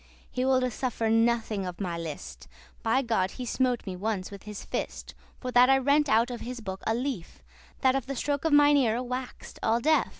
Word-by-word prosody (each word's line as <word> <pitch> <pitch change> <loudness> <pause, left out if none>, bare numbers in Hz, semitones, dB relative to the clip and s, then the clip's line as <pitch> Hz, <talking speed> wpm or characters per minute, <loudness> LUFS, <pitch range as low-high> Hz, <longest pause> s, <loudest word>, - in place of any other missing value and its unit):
He 250 - -2
woulde 255 -1 +2
suffer 230 -3 -1
nothing 225 -3 +2
of 180 -1 -6
my 180 -4 -2
list.* 145 - -7
*pleasure 65 +3 -24 0.2
By 230 +4 +2
God, 210 -6 0
he 250 - -4
smote 250 0 0
me 190 -2 -4
ones 200 0 -3
with 200 -1 -9
his 210 - -7
fist, - - -4 0.3
For 255 - -4
that 245 +1 +6
I 270 - +6
rent 285 +2 +3
out 230 +2 +3
of 240 - -6
his 245 +1 -5
book 195 -3 -6
a 225 - +2
leaf, 245 -8 -4 0.4
That 260 -1 +4
of 270 -2 -2
the 275 - -3
stroke 290 +4 -1
mine 290 0 +6
eare 245 -2 +2
wax'd 250 0 -6
all 225 +1 +2
deaf. 310 +5 +3
240 Hz, 210 wpm, -28 LUFS, 205-260 Hz, 0.4 s, that